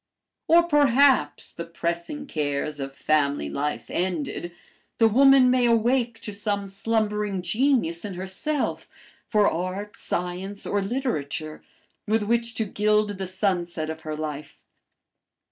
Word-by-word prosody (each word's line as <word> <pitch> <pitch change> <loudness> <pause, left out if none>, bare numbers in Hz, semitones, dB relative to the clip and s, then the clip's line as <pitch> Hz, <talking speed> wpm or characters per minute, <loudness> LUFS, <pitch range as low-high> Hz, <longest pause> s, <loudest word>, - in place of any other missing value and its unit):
"Or, 340 +1 +6
perhaps, 280 - +3
the 170 - -6
pressing 170 - -4
cares 145 - -2
of 135 0 -5
family 140 - +1
life 150 - -3
ended, 175 -2 -2 0.5
the 225 - +5
woman 265 +2 +6
may 250 -1 +3
awake 235 0 +2
to 210 - -5
some 205 -1 -2
slumbering 210 -1 -1
genius 215 - +1
in 200 -3 -5
herself 190 - -2 0.4
for 210 -2 +3
art, 185 +5 -3
science, 180 +3 -4
or 205 - 0
literature, 160 - -3 0.5
with 215 +1 +2
which 235 +2 0
to 220 - -1
gild 210 0 +1
the 190 - -3
sunset 175 -4 -1
of 160 0 -8
her 155 -1 -4
life. 150 -1 -6
200 Hz, 130 wpm, -25 LUFS, 170-230 Hz, 0.5 s, Or